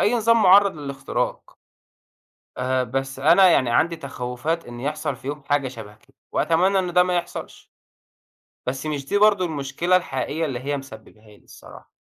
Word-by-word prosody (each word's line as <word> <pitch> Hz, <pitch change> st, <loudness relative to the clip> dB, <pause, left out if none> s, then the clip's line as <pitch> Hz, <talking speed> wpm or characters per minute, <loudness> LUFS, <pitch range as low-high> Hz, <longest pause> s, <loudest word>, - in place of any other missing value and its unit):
أي 220 Hz, -, +2 dB
نظام 230 Hz, -1 st, +3 dB
مُعرض 200 Hz, -1 st, +6 dB
للاختراق. 140 Hz, -2 st, -4 dB, 1.0 s
آآ، 130 Hz, 0 st, 0 dB
بس 135 Hz, +2 st, -4 dB
أنا 175 Hz, +6 st, +6 dB
يعني 130 Hz, -7 st, +3 dB
عندي 165 Hz, +8 st, +2 dB
تخوّفات 140 Hz, +4 st, -4 dB
إن 120 Hz, 0 st, -9 dB
يحصل 145 Hz, +1 st, -3 dB
في 130 Hz, -, -11 dB
يوم 145 Hz, 0 st, -5 dB
حاجة 145 Hz, -2 st, +1 dB
شبه 110 Hz, -5 st, -10 dB
كده، 135 Hz, +6 st, -29 dB, 0.2 s
وأتمنى 180 Hz, +5 st, +2 dB
إن 180 Hz, -2 st, -3 dB
ده 180 Hz, -, +5 dB
ما 180 Hz, 0 st, -1 dB
يحصلش. 175 Hz, 0 st, -7 dB, 1.0 s
بس 130 Hz, +3 st, -3 dB
مش 145 Hz, -3 st, -3 dB
دي 205 Hz, -, 0 dB
برضو 205 Hz, -3 st, +4 dB
المشكلة 155 Hz, +3 st, -1 dB
الحقيقية 160 Hz, -2 st, -1 dB
اللي 130 Hz, -5 st, -4 dB
هي 140 Hz, +3 st, -3 dB
مسبباها 110 Hz, -4 st, -13 dB
لي 105 Hz, -1 st, -19 dB
الصراحة، -, -, -15 dB
145 Hz, 165 wpm, -23 LUFS, 130-175 Hz, 1.0 s, مُعرض